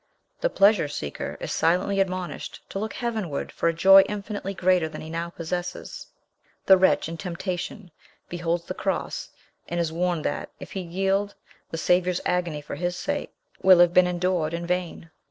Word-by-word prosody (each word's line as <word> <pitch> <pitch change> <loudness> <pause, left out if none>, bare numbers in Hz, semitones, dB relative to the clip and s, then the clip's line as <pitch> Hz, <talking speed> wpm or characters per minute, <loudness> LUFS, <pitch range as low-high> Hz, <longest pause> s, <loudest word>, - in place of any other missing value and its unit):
The - - +1
pleasure 200 - +4
seeker 75 - -5
is - - -5
silently 185 +4 +1
admonished 185 -2 -3
to 195 - -4
look 220 +2 -3
heavenward 220 - -3
for 170 - +1
a - - 0
joy 195 +4 +8
infinitely 205 -1 -4
greater 180 -3 +2
than - - -8
he 155 - -8
now 170 +1 -3
possesses. 175 +1 -5 0.6
The 190 - +8
wretch 185 -3 +3
in 165 0 -6
temptation 180 +1 -5 0.4
beholds 170 0 -2
the - - -4
cross, - - -3 0.4
and 175 - -2
is 165 -2 -1
warned 175 -2 -1
that, - - -2
if - - -10
he 195 - -4
yield, 195 +3 -1 0.3
the 165 - -4
Saviour's 180 +1 +2
agony 175 -4 0
for 145 - -8
his 175 0 -1
sake - - -3 0.3
will 185 -1 +7
have 175 0 +5
been 180 0 +6
endured 175 -2 0
in 170 0 -4
vain. 175 -2 -3
180 Hz, 170 wpm, -25 LUFS, 170-190 Hz, 0.6 s, joy